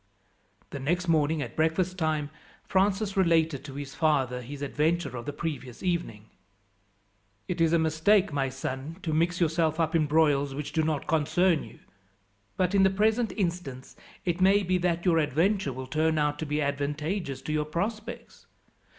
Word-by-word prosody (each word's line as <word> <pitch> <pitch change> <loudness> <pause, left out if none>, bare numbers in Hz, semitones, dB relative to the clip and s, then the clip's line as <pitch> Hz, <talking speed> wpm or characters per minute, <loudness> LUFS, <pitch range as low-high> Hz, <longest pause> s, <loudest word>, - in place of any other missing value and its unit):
The 140 - -5
next 175 +7 -1
morning, 155 -2 +2
at 120 - -8
breakfast 165 +3 +1
time, 155 -4 -1 0.3
Francis 195 +1 +1
related 165 -6 +2
to 135 -2 -8
his 140 -1 -6
father 135 -5 +1
his 140 +4 -7
adventure 155 +2 0
of 120 +2 -7
the - - -1
previous 145 -4 -5
evening. 170 - -2 1.2
"It 175 -2 -2
is 165 -1 +4
a 170 - +4
mistake, 160 +4 +2
my 135 -2 0
son, 135 +4 -5
to 160 - -2
mix 170 +3 +1
yourself 160 -1 +1
up 165 0 +1
in 155 -2 +3
broils 145 -3 +2
which 150 0 -5
do 160 - +2
not 155 -2 -1
concern 165 +2 +2
you; - - -12 0.8
but 185 +1 +1
in 200 - +4
the 190 - +6
present 220 +4 +1
instance 170 - -4 0.3
it 175 0 -1
may 195 +2 +5
be 185 0 +1
that 170 0 0
your 170 -3 +4
adventure 165 +3 +1
will 130 +1 -6
turn 155 +4 +1
out 150 -1 0
to 160 - -3
be 150 +1 0
advantageous 145 +2 -2
to 155 - -3
your 150 -1 0
prospects. 215 +8 -5
160 Hz, 170 wpm, -28 LUFS, 145-180 Hz, 1.2 s, the